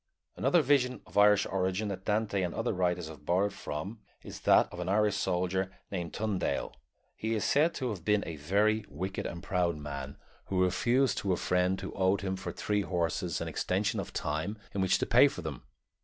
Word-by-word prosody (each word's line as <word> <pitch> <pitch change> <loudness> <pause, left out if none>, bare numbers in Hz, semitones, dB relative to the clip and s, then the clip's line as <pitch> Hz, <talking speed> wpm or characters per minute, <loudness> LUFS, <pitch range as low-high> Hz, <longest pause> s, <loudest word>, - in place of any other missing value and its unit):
Another 175 -3 +3
vision 130 -2 +2
of - - -18
Irish 105 0 +6
origin 95 +2 -1
that 95 -1 -6
Dante 105 -2 0
and 90 -2 -2
other 115 0 -1
writers 90 -2 0
have 80 -2 -11
borrowed 95 +5 +1
from 95 +7 -5 0.2
is - - -8
that - - +5
of 90 - -7
an 90 +1 -3
Irish 105 0 +3
soldier 95 -1 0 0.2
named 90 -4 -3
Tundale. 105 -3 -2 0.4
He 110 +1 -2
is 110 - -1
said 155 +4 +3
to 130 -3 -2
have 95 -6 -6
been 105 +2 +2
a 80 -2 -6
very 105 +8 +2
wicked 95 +6 -4
and 85 0 -7
proud 90 -3 0
man, 70 -2 -6 0.3
who 95 -1 +1
refused 120 +6 +2
to 95 -2 0
a - - 0
friend 90 +1 +1
who 95 - -5
owed 95 +1 +2
him 95 -1 -2
for 95 - -5
three 105 -1 -1
horses 85 -4 -1
an - - -3
extension 105 +4 -1
of 100 - -5
time 80 +8 -2 0.2
in 100 - -1
which 95 - +3
to - - -1
pay - - +6
for - - -6
them. - - -5
95 Hz, 200 wpm, -30 LUFS, 90-105 Hz, 0.4 s, Irish